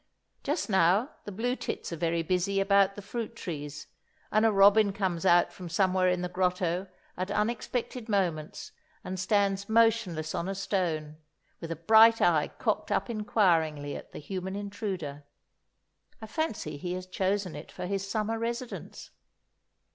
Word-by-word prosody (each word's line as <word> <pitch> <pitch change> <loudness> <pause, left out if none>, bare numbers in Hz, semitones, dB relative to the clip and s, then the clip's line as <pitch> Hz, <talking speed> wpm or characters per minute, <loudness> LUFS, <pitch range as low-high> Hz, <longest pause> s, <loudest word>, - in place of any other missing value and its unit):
Just 295 +4 -1
now 190 - +3
the 205 - -6
blue 240 +6 -1
tits 180 - -5
are - - -2
very 165 +1 0
busy 185 +3 0
about 195 0 +3
the 205 - -8
fruit 230 +2 -5
trees, 150 -7 -6 0.5
and 215 +1 +3
a - - +3
robin 200 +1 +5
comes 190 -3 -1
out 175 0 +4
from 180 -2 -8
somewhere 185 +1 +2
in 180 0 0
the - - -1
grotto 180 0 0 0.3
at 185 +2 -3
unexpected 235 +2 -2
moments 185 - -1 0.3
and 185 0 -5
stands 200 +1 +1
motionless 220 -9 +2
on 170 - -2
a 195 - -2
stone, 165 -6 -2 0.4
with 165 -1 -6
a - - -1
bright 220 +7 +6
eye 160 -4 +3
cocked - - -2
up 240 - 0
inquiringly 165 -9 +1
at - - -9
the - - -9
human 190 +4 -5
intruder. 195 -8 -5 1.0
I 220 - -7
fancy 215 - -3
he 175 +4 -4
has 185 0 -5
chosen 190 0 -1
it 150 - -9
for - - -6
his 195 +1 -3
summer 220 +2 -1
residence. 235 +2 -5
190 Hz, 155 wpm, -29 LUFS, 175-215 Hz, 1.0 s, bright